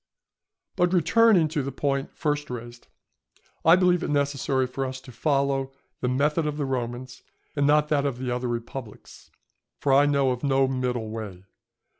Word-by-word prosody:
But 175 +1 +2
returning 190 0 +4
to 150 -1 -1
the 135 +1 -4
point 135 0 -2
first 150 -1 -1
raised, 120 -1 -8 0.8
I 165 +1 +7
believe 180 -1 +3
it - - -3
necessary 140 -2 0
for 130 +2 -4
us 130 0 -4
to 130 - -13
follow 135 +1 0 0.3
the 125 - -1
method 150 +5 +1
of 150 0 -3
the 145 - -1
Romans 125 -1 -4 0.3
and 140 -1 +2
not 150 0 +3
that 145 -2 +2
of 130 -3 -3
the 125 -1 -3
other 125 +1 -2
republics, 120 -1 -7 0.5
for 140 - +1
I 140 +2 +5
know 140 -2 +2
of 125 +1 -4
no 135 -1 +3
middle 125 -4 -2
way. 100 -5 -7
135 Hz, 170 wpm, -25 LUFS, 125-150 Hz, 0.8 s, I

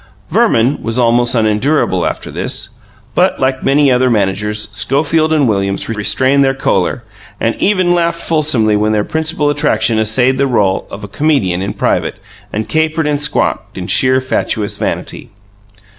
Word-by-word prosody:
Verman 120 +5 +2
was 115 +1 -1
almost 120 0 +2
unendurable 110 - +1
after - - -5
this, - - -3 0.4
but, - - +1
like 130 0 0
many, 140 +2 +2
many 140 - +4
other 125 0 +2
managers, 105 0 -1
Schofield 145 +9 0
and 150 -4 +2
Williams 100 -2 -1
restrained 130 +6 +2
their 135 0 +1
choler, 100 0 -1 0.4
and 115 - 0
even 185 -3 +1
laughed 170 -1 0
fulsomely 145 -11 +1
when 105 +1 +1
their 105 -1 +1
principal 160 0 -1
attraction 110 -6 +1
essayed 125 +5 +1
the 140 - +2
role 100 -7 0
of 105 - -9
a - - -6
comedian 100 - 0
in 100 - -4
private, - - -1 0.4
and 110 +1 -3
capered 160 +4 0
and 145 -1 -1
squawked 150 - -1
in - - -5
sheer, 130 0 +3
fatuous 115 -5 -2
vanity. - - -4
125 Hz, 160 wpm, -14 LUFS, 105-145 Hz, 0.4 s, many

